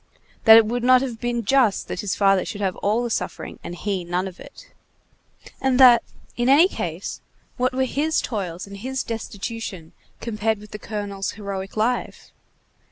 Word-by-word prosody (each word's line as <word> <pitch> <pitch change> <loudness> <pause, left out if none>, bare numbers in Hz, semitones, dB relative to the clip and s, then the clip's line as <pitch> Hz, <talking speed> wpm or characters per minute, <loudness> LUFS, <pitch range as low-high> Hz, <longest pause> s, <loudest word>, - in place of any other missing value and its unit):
that 225 -1 +10
it 225 - +6
would 240 +2 -2
not 255 +1 +6
have 240 -4 -5
been 240 -2 -2
just 245 -4 +2
that - - -5
his 200 -1 -2
father 195 -2 +3
should 205 - -6
have 190 -3 -1
all 215 +4 0
the 240 - -2
suffering, - - -4
and 175 - -6
he 195 -1 -2
none 175 +2 -2
of 185 - -10
it; - - -14 0.9
and 265 -1 +2
that, 245 -3 +8 0.3
in 240 +1 +1
any 300 +7 +7
case, - - -5 0.4
what 255 +1 +1
were 260 +1 +1
his 305 +5 0
toils 185 -7 -4
and 200 0 -10
his 260 +5 -3
destitution 220 -5 -6 0.3
compared 220 -1 -1
with 210 +1 -14
the 210 - -7
colonel's 200 -3 -4
heroic 200 -1 -6
life? 240 +3 -1
220 Hz, 175 wpm, -23 LUFS, 195-245 Hz, 0.9 s, that